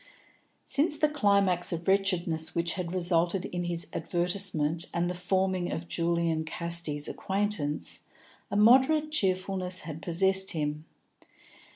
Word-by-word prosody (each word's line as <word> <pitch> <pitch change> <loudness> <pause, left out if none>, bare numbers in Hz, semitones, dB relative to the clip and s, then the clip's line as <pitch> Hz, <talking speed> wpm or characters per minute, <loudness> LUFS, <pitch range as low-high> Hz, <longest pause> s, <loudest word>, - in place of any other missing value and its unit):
Since 295 +2 +2
the 305 - +3
climax 200 - +2
of 170 +1 -5
wretchedness 180 -5 +1
which 170 0 0
had 180 -2 -4
resulted 175 +1 0
in 175 -2 -4
his 170 -1 -1
advertisement 175 -2 0
and 170 +1 0
the 180 - -2
forming 185 0 -1
of 165 +1 -5
Julian 170 -2 0
Casti's 165 -2 -2
acquaintance, 195 -7 -1 0.5
a - - -4
moderate 265 +8 +4
cheerfulness 185 -6 0
had 155 0 -8
possessed 190 +2 +1
him. 150 -1 -3
180 Hz, 120 wpm, -28 LUFS, 170-195 Hz, 0.5 s, moderate